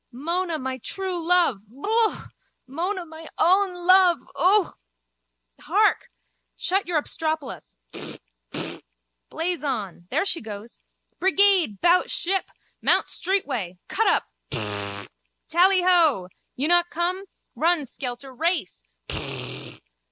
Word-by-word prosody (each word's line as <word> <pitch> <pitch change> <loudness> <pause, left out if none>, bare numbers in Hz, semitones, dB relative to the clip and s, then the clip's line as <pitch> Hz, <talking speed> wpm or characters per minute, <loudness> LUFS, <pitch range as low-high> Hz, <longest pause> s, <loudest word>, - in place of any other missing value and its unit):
Mona, 335 +6 -2
my 260 -2 -4
true 370 - -3
love. 340 - +3
Yook. 430 - 0 0.4
Mona, 350 +7 -3
my 320 0 -10
own 375 +2 +3
love. 370 -2 +6 0.2
Ook. 370 +6 +3 0.8
Hark! - - +1 0.5
Shut 385 +2 0
your 340 -3 +1
obstropolos. 310 - -4 0.2
Pflaap! - - -9 0.3
Pflaap! - - -6 0.5
Blaze 340 0 -2
on. 205 - -4
There 310 +9 0
she 345 - +1
goes. 215 +1 -8 0.4
Brigade! 380 - +3
Bout 355 +1 +4
ship. 380 +2 -1 0.3
Mount - - +3
street 385 +1 0
way. 195 -10 -4
Cut - - +1
up! - - +3 0.3
Pflaap! 100 -1 -5 0.4
Tally 370 +2 +4
ho. 320 - +4 0.3
You 280 +4 +2
not 350 0 +3
come? 360 +4 -2 0.3
Run, 330 -2 +2
skelter, 255 +1 -6
race. 310 - -1
335 Hz, 115 wpm, -24 LUFS, 260-365 Hz, 0.8 s, love